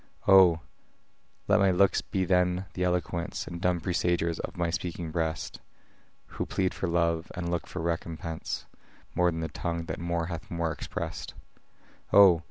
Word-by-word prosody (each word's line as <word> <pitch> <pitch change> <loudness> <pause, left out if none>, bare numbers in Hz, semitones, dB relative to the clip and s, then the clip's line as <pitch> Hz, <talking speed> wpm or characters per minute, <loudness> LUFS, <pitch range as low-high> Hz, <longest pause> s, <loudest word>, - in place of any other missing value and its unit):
O! 90 -4 +7 0.9
let 105 +1 +5
my 100 -1 +5
looks 95 +1 +3
be 95 -1 -1
then 90 +1 +2
the 90 - -2
eloquence 90 -1 -1
And 85 0 -7
dumb 90 -1 +2
presagers 85 -2 0
of - - -6
my 85 -1 0
speaking 85 -2 -3
breast, 80 -1 -2 0.7
Who - - -5
plead 95 -1 0
for 95 - -2
love, 85 -1 +1
and 85 -1 -3
look 85 - -2
for 90 - -5
recompense, 80 -1 -3 0.5
More 90 0 +3
than 80 -1 -3
that 80 -3 -4
tongue 85 -1 -3
that - - -5
more 85 -1 -1
hath 85 -1 -6
more 85 -1 -1
express'd. 75 - -5 0.8
O! 95 -5 +8
85 Hz, 160 wpm, -28 LUFS, 85-90 Hz, 0.9 s, O